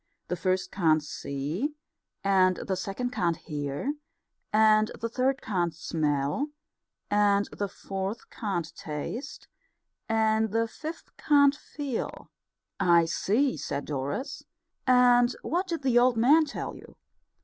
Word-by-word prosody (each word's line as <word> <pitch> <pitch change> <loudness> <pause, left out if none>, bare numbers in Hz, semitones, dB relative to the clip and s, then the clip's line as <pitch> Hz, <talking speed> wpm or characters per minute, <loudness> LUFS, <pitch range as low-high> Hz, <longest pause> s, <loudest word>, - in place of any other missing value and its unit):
The 180 - 0
first 185 +1 -1
can't 160 -5 +3
see, 150 - -3 0.5
and 185 -2 +4
the 190 - -2
second 200 +7 -3
can't 170 -8 0
hear, 145 - -3 0.6
and 215 0 +5
the 230 - -2
third 265 +3 0
can't 175 -6 -1
smell, 150 - -1 0.6
and 205 -1 +3
the 205 - -2
fourth 195 +2 -5
can't 175 -7 -3
taste, 165 - -6 0.6
and 220 0 +2
the 225 +2 +1
fifth 315 +8 -8
can't 285 -2 +5
feel." 285 -4 -5 0.5
"I 170 -3 +5
see," 215 - +1
said 145 0 -4
Doris. 145 - -4 0.4
"And 245 -1 +5
what 360 +4 -1
did 335 -5 -3
the 245 -3 +4
old 245 -1 +3
man 290 +8 +5
tell 280 - -5
you?" - - -14
210 Hz, 125 wpm, -28 LUFS, 170-255 Hz, 0.6 s, and